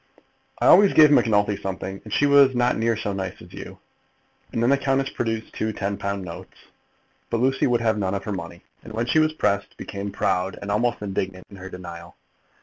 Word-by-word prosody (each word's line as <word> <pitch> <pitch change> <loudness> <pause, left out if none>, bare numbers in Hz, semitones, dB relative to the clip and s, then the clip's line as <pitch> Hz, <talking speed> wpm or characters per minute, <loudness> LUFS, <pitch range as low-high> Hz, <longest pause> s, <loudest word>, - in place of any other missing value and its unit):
"I - - 0
always 200 -1 +7
gave 155 -2 +7
Macnulty 105 -6 +3
something, 95 0 -5
and 110 - -11
she 145 - +2
was 140 -2 +5
not 120 0 +2
near 115 0 0
so 100 -2 -3
nice 95 -1 -5
as - - -14
you." - - -9 0.7
And 115 - -1
then 120 - +3
the 140 - +4
countess 135 0 0
produced 115 -1 -3
two 110 - -2
ten 100 0 -2
pound 100 -1 -4
notes. 85 - -10 0.7
But 115 - -1
Lucy 135 +2 +2
would 120 -2 +1
have 110 -2 +1
none 95 -1 -1
of 100 - -4
her 105 - -4
money, 85 -2 -7 0.2
and 110 - -11
when 115 +2 -1
she 155 - +2
was 155 0 +3
pressed, 100 -9 -1
became 100 0 -6
proud 90 0 -1
and 100 - -5
almost 115 +1 0
indignant 95 -2 -4
in 100 - -11
her 95 0 -9
denial. 85 -2 -10
105 Hz, 210 wpm, -23 LUFS, 95-120 Hz, 0.7 s, always